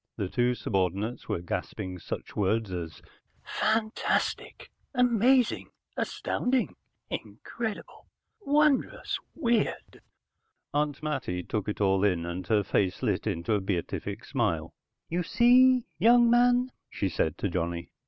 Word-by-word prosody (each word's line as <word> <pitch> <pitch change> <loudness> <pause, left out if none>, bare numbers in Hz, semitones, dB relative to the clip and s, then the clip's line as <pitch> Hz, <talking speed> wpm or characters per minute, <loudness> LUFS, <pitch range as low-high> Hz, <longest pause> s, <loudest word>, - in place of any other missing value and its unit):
The 100 -4 -2
two 125 +3 +1
subordinates 100 +2 -2
were - - -1
gasping 90 +1 -4
such - - -6
words 105 +1 0
as 85 -3 -6 0.4
"Fantastic, 220 +1 -1 0.2
amazing, 250 0 +3 0.3
astounding, 250 0 -1 0.4
incredible, 225 -3 -6 0.3
wondrous, 300 -6 +1 0.2
weird". 235 -8 -1 0.7
Aunt 145 0 -1
Mattie 90 -12 -2
took 105 +2 -3
it 105 - -4
all 95 -1 +3
in, 90 -5 +2
and 85 +2 -5
her 105 -3 +3
face 95 -2 0
lit - - 0
into 85 +6 -1
a 105 - +1
beatific 95 -3 -3
smile. 80 0 -1 0.3
"You 175 +2 -1
see, 250 +6 +5
young 235 +4 +6
man," 245 +1 +4 0.2
she 100 - -2
said 80 -3 -1
to - - -1
Johnny. 85 -1 -3
115 Hz, 120 wpm, -28 LUFS, -, 0.7 s, young